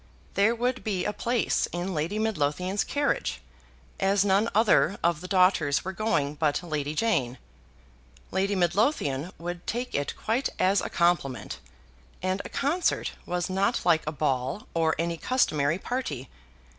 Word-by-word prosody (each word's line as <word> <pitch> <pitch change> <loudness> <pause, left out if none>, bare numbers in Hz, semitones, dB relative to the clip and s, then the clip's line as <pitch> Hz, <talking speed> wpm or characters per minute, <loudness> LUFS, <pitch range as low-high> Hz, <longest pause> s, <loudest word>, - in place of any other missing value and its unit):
There 210 +4 +3
would 245 +2 -1
be 190 -4 -1
a 210 - -1
place 235 +1 0
in 175 +2 -3
Lady 165 +6 -1
Midlothian's 185 -2 0
carriage, 285 0 -1 0.6
as 195 +1 +3
none 200 +3 +3
other 210 -2 +4
of 170 -2 +2
the 185 - -6
daughters 185 -7 +3
were 190 - -2
going 190 -9 0
but 150 +2 0
Lady 150 -3 -3
Jane. 135 - +1 0.9
Lady 195 +2 +1
Midlothian 175 - +1
would 175 +1 -6
take 245 +2 -3
it 145 - -1
quite 235 +5 0
as 190 +2 +3
a - - -4
compliment, 155 - 0 0.6
and 185 +1 0
a - - -8
concert 320 +6 0 0.2
was 175 -1 -1
not 195 +4 0
like 165 -2 +4
a - - 0
ball 135 +3 -1
or 160 -1 +2
any 170 +1 -1
customary 155 - +1
party. 185 - -4
185 Hz, 145 wpm, -27 LUFS, 155-210 Hz, 0.9 s, other